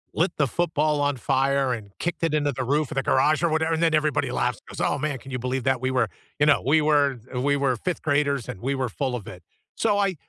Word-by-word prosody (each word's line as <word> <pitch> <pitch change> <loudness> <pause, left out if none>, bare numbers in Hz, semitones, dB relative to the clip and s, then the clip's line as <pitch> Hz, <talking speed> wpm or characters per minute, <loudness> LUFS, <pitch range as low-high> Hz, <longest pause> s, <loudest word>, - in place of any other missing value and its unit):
“lit 170 +4 +2
the 145 - +2
football 155 -1 0
on 145 -2 +1
fire 135 0 +1
and 105 -3 -7
kicked 170 -1 -3
it 165 - +1
into 145 -1 +1
the 130 0 -3
roof 145 +3 0
of 155 - -5
the 135 - 0
garage?" 150 +4 +3
or 170 - +3
whatever, 160 +1 +1
then 165 0 +2
everybody 145 -4 +1
laughs 125 -2 -1
and - - -10
goes, - - 0
"Oh, 145 - 0
man, 145 -2 -2
can 135 +2 -12
you 125 - -3
believe 125 +1 -2
that? 130 -2 +1
We 130 - 0
were 125 -4 +2 0.3
"you 150 - +4
know, 150 - +4
"We 155 +3 +4
were 145 -4 +2
the 125 - -2
we 140 +1 +2
were 135 -2 +1
5th 175 +9 -3
graders 140 -4 +1
and 95 - -7
we 135 +3 -1
were 130 -2 -1
full 130 +3 -2
of 110 - -7
it." 90 -2 -10 0.3
So 210 -3 +1
I 195 -3 +1
140 Hz, 270 wpm, -24 LUFS, 130-155 Hz, 0.3 s, you